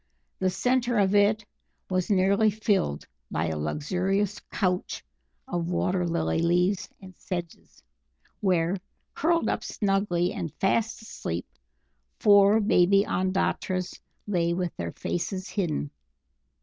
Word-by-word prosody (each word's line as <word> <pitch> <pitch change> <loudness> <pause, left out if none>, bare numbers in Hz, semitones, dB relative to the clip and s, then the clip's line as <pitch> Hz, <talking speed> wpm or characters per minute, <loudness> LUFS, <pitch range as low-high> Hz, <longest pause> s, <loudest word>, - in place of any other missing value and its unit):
The 185 - +2
centre 245 +5 +1
of 195 -1 +3
it 205 +1 +3 0.4
was 185 0 -1
nearly 200 +2 +4
filled 200 - 0 0.2
by 80 +1 -1
a 80 - -2
luxurious 185 - -1
couch 180 -3 -1 0.4
of 175 -1 -2
water 180 0 0
lily 165 -1 0
leaves 180 +3 +1
and 185 -1 -12
sedges, 175 -2 -7 0.6
where, 180 -2 +1 0.4
curled 335 +2 +1
up - - -1
snugly 195 -4 0
and 165 - -4
fast 220 +3 0
asleep, 85 - -5 0.7
four 205 +1 +6
baby 200 -1 +4
Ondatras 185 -1 -1 0.2
lay 170 -4 +1
with 180 -2 -2
their 85 -1 -4
faces 185 - -3
hidden. 160 - -2
185 Hz, 115 wpm, -27 LUFS, 175-205 Hz, 0.7 s, four